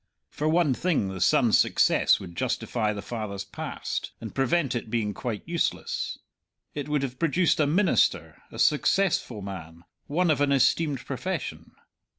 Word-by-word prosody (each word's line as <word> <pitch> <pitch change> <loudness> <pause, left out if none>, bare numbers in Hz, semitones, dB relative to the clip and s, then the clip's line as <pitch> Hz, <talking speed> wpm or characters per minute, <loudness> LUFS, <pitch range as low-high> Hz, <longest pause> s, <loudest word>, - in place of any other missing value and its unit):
For 155 +1 -1
one 160 -4 +3
thing, 155 - 0
the 95 -1 -6
son's - - +4
success - - +3
would 85 -3 -10
justify 120 -3 -1
the 100 -1 -6
father's 100 -2 -5
past - - -5
and 110 - -8
prevent 135 +2 +1
it 120 -3 -4
being 110 -3 -1
quite 110 0 -4
useless; 170 0 -2 0.6
it 145 0 -5
would 150 -2 +1
have 130 -2 -5
produced 165 +2 +2
a 150 - +3
minister, 185 +7 +1
a - - -10
successful 155 - +2
man, 85 -4 -8 0.2
one 170 +3 +2
of 145 - +1
an 145 -1 +3
esteemed 140 -1 +2
profession. 130 - -5
130 Hz, 155 wpm, -26 LUFS, 105-155 Hz, 0.6 s, son's